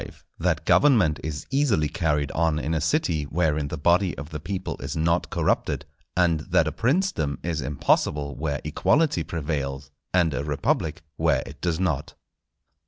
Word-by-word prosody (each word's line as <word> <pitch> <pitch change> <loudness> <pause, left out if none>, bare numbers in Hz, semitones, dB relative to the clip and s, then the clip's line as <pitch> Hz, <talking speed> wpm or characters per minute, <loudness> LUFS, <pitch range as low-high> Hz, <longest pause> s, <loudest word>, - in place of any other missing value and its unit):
—_That - - 0
Government 105 - +4
is 75 -1 -4
easily 130 - +2
carried 75 -4 0
on 80 -1 +1
in 75 +2 -2
a 80 - 0
City 80 - +1
wherein 75 -1 0
the 80 - -5
body 90 +5 +2
of 75 +2 -7
the 75 - -4
People 90 +5 -4
is - - -4
not 85 +2 +1
corrupted: - - 0 0.3
and 85 -3 +3
that 85 +1 +2
a - - 0
Princedom 115 - 0
is 85 -3 -2
impossible 70 +1 0
where 75 -3 -2
Equality 150 - +2
prevails, 70 -4 -3 0.2
and 85 -4 +3
a 65 +3 -2
Republic 75 +1 -1
where 80 -5 +2
it 70 0 -11
does 85 -2 0
not_. 90 -6 -1
80 Hz, 160 wpm, -25 LUFS, 75-90 Hz, 0.3 s, Government